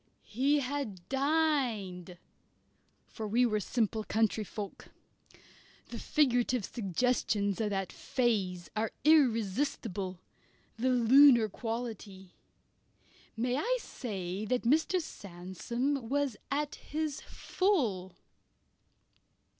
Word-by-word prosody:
He 280 +5 +3
had 255 -10 -4
dined 265 - 0 0.9
for 220 - -6
we 240 +4 +3
were 215 -3 +1
simple 220 0 -1
country 220 0 +1
folk. 205 0 -7 1.0
The - - -6
figurative 245 -6 +1
suggestions 205 -1 0
of 215 - 0
that 195 -2 -2
"phase" 195 -9 -1
are 215 +1 -1
irresistible 225 - +1 0.6
the 250 +3 0
lunar 250 -1 +6
quality. 220 -5 -6 1.0
May 245 +3 0
I - - +1
say 195 - -5
that 250 +3 0
Mr. 315 +9 +2
Sandsome 230 - -4
was 285 -3 0
at 290 +1 -1
his 305 -1 -4
full? 230 - -1
230 Hz, 90 wpm, -31 LUFS, 200-275 Hz, 1.0 s, lunar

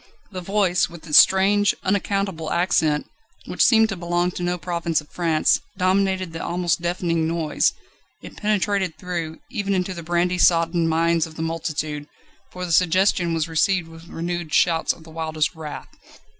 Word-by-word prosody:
The 185 -2 -6
voice, 185 -2 +1
with 170 -2 -12
its 150 -3 +7
strange, 200 +2 +4
unaccountable 195 -4 -1
accent, 160 -4 +1 0.4
which - - 0
seemed 225 -2 +5
to 195 - -3
belong 175 0 -1
to 180 - -7
no 175 0 -1
province 170 -2 -1
of 150 - -14
France, 165 -3 +1 0.2
dominated 185 -1 +1
the 165 - -5
almost 175 -1 -1
deafening 170 -2 -1
noise; 165 -2 +1 0.5
it - - -10
penetrated 200 -4 -1
through, 170 -3 -5
even 200 -5 -1
into 185 0 -1
the 170 - -7
brandy 175 +2 0
soddened 165 -1 +3
minds 165 0 +1
of 160 - -14
the 160 - -4
multitude, 155 -2 -3 0.4
for 180 0 -6
the 175 - -5
suggestion 180 0 +2
was 160 0 -1
received 165 +1 +1
with 165 +1 -13
renewed 170 -1 -4
shouts 165 -2 +3
of 165 - -10
the 160 - -14
wildest 160 -1 -2
wrath. 155 -3 -8
170 Hz, 165 wpm, -22 LUFS, 165-185 Hz, 0.5 s, its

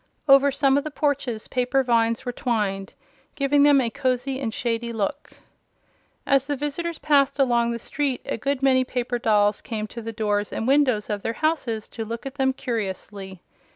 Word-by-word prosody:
Over 275 0 +6
some 275 0 +3
of - - -6
the 310 - -4
porches 280 -7 -1
paper 255 +2 +1
vines 230 -2 +1
were 245 - -1
twined, 210 -6 -2 0.4
giving 285 0 +2
them 285 -1 +6
a 235 -3 0
cozy 255 +2 -1
and 240 -5 -2
shady 235 0 -2
look. 230 +7 -3 0.9
As 275 -1 +2
the 290 - -1
visitors 295 +4 -3
passed 285 -2 +2
along 240 -4 +2
the 235 - -2
street 275 +2 -2
a - - -2
good 275 +3 -2
many 260 -1 +4
paper 245 -1 -2
dolls 210 -2 +2
came 215 -2 -4
to 235 +2 -8
the 225 0 -5
doors 210 -2 -1
and 225 - -3
windows 260 -6 +3
of 205 -1 -2
their 225 - -2
houses 260 -8 -1
to 225 - -5
look 230 +4 -6
at 270 - -5
them 265 -2 +1
curiously. 200 -6 -5
250 Hz, 185 wpm, -24 LUFS, 225-275 Hz, 0.9 s, Over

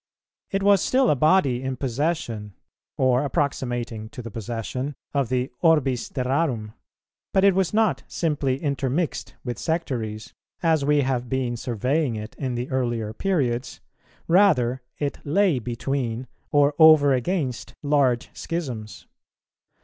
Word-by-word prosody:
It 195 0 -1
was 200 -1 +5
still 260 -1 +3
a - - +3
body 140 -4 +3
in 130 0 -3
possession, 125 - -2 0.4
or 130 0 +3
approximating 120 -7 -2
to 125 0 -9
the 115 - -7
possession, 120 +5 -4 0.2
of 140 -5 0
the 125 0 -1
orbis 140 -7 +2
terrarum; 125 -4 -1 0.6
but 190 - +3
it 200 -1 +6
was 190 -1 +1
not 220 0 +2
simply 145 -5 -1
intermixed 140 +2 -2
with 120 -3 -4
sectaries, 120 -10 -3 0.3
as 160 -3 +3
we 145 +1 +3
have 125 -2 -1
been 130 -2 -1
surveying 125 +4 -1
it 110 0 -6
in 130 -3 -2
the 120 +1 -3
earlier 120 -4 -1
periods, 130 - -1 0.5
rather 150 -10 +4 0.2
it 145 -1 -3
lay 170 -1 +2
between 125 0 -3 0.3
or 145 0 +4
over 155 -3 +7
against 130 -1 -2
large 140 -5 +2
schisms. 125 -11 -5
130 Hz, 130 wpm, -24 LUFS, 120-155 Hz, 0.6 s, over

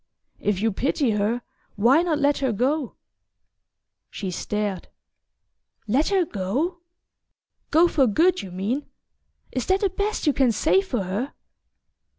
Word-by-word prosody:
"If 205 -1 -1
you 225 - +2
pity 265 +3 0
her, 215 +4 0 0.3
why 240 +9 +5
not 340 -3 0
let 290 0 +2
her 265 -3 +1
go?" 260 +5 -1 1.1
She 190 -3 -5
stared. 205 0 -3 1.0
"Let 265 +9 +2
her 385 -3 +2
go 275 - -2 0.9
go 330 +3 +5
for 280 -6 +3
good, 345 - +3
you 190 - -8
mean? 205 +11 -3 0.6
Is 255 - -3
that 380 +1 +2
the 400 -3 +1
best 405 +2 -2
you 295 - +4
can 265 -3 +3
say 315 - +3
for 250 - -2
her?" 205 +9 -3
265 Hz, 140 wpm, -24 LUFS, 210-320 Hz, 1.1 s, why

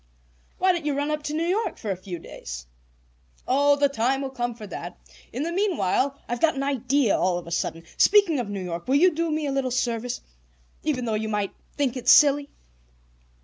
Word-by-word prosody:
"Why 370 0 +4
don't 345 -3 -2
you 295 -2 -1
run 285 +2 -1
up 300 0 -1
to 295 - -3
New 325 +2 0
York 395 +6 -1
for 210 - -4
a - - -1
few 180 -1 -7
days?" 60 - -8 0.8
"Oh, 285 +2 +4
the 285 0 +3
time 270 +1 0
will 270 - -4
come 240 -2 -3
for 220 -2 -9
that. 175 -2 -7 0.3
In 255 +5 -3
the 335 - -2
meanwhile, 280 - 0
I've 240 0 -3
got 325 -2 +3
an 275 - -2
idea 275 -3 +1
all 180 -1 +1
of 175 - -7
a 170 - -9
sudden. 165 0 -2
Speaking 400 -8 +5
of 235 -4 -3
New 200 -2 -4
York, 170 -1 -5
will 265 - +2
you 350 +4 +5
do 335 +1 -1
me 310 -1 -1
a 280 - -1
little 270 -1 0
service? 245 -1 -2 0.6
Even 265 -6 -1
though 225 - -1
you 220 +1 -1
might 205 -2 -1 0.3
think 275 -3 0
it 255 - -6
silly?" 285 -1 +6
265 Hz, 215 wpm, -25 LUFS, 215-295 Hz, 0.8 s, silly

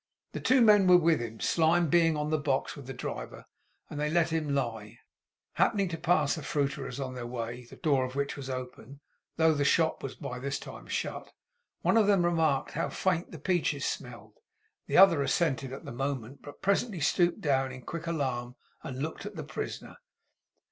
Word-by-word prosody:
The - - -5
two 260 0 +4
men 210 -3 +6
were 180 0 +8
with 165 -2 +3
him. 115 -2 -6
Slyme 165 +1 +3
being 165 0 +3
on 150 +1 -2
the 155 - +2
box 140 -2 -1
with 140 -3 -11
the - - -5
driver; 125 - -6 0.4
and 145 - -7
they 150 0 0
let 170 0 +2
him 160 -2 -1
lie. 115 -4 -3 0.6
Happening 200 -3 +2
to 165 - -4
pass 160 -3 +2
a - - -5
fruiterer's 140 -2 -2
on 130 -2 -4
their 125 -2 -6
way; 120 0 -5
the - - -13
door 140 -4 +1
of 130 0 -5
which 140 0 -1
was 135 -2 -7
open, 130 +1 -7 0.4
though 160 -1 +4
the 145 -1 0
shop 160 +3 +2
was 135 - -6
by 125 -3 -6
this 140 +2 -2
time - - -10
shut; - - -4 0.5
one - - +3
of 215 -3 +4
them 195 -4 +4
remarked 160 -5 +1
how 165 - -2
faint 180 -2 -1
the 165 - -8
peaches 155 -4 0
smelled. - - -6 0.5
The - - +1
other 180 -6 +7
assented 135 -2 0
at 135 - -8
the - - -6
moment, 135 0 -4
but 145 - -12
presently 200 0 +1
stooped 175 +4 +2
down 135 -3 +1
in 130 -1 -10
quick 170 +4 -6
alarm, 130 -6 -2 0.3
and 135 0 -5
looked 160 - -5
at - - -9
the - - -5
prisoner. - - -6
145 Hz, 195 wpm, -29 LUFS, 130-170 Hz, 0.6 s, were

